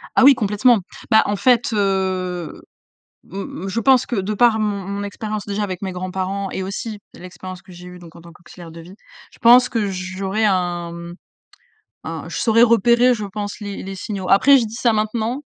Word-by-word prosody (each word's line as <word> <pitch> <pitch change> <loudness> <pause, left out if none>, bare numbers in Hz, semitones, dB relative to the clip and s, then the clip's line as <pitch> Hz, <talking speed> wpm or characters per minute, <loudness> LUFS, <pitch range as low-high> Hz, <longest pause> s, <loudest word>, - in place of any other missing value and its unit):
Ah 260 - +5
oui, 275 -1 +8
complètement. 220 +1 +2 0.3
Bah, 220 -1 +5
en 205 - -1
fait, 245 +2 +2
heu, 185 -3 -2 0.7
m 195 -2 -7
m - - -4
je 210 +4 -2
pense 260 +2 +4
que 240 - -4
de 200 +2 -2
par 230 0 +3
mon 205 -3 -2
mon 200 0 -4
expérience 215 0 -5
déjà 205 +1 -3
avec 185 -3 -4
mes 190 -2 -4
grands-parents 185 +2 -4
et 190 - -4
aussi 205 +3 -5 0.2
l'expérience 185 +1 -10
que - - -18
j'ai 175 +1 -12
eu 180 0 -11
donc 170 -2 -14
en - - -13
tant 170 0 -14
qu'auxiliaire 170 0 -14
de 165 - -11
vie, 175 +3 -13 0.4
je - - -21
pense 245 +1 +6
que 220 -4 -1
j'aurais 190 +3 -3
un 175 -4 0 0.9
mmh, - - -9
je - - -5
saurais 230 0 +4
repérer, 235 +2 +4
je 215 -3 -4
pense 205 +2 -6
les 205 -1 -6
les 195 0 -7
signaux. 190 -1 -5
Après 275 +8 +6
je 240 - 0
dis 220 +1 -8
ça 235 0 +2
maintenant, 220 +4 -2
200 Hz, 200 wpm, -20 LUFS, 185-225 Hz, 0.9 s, oui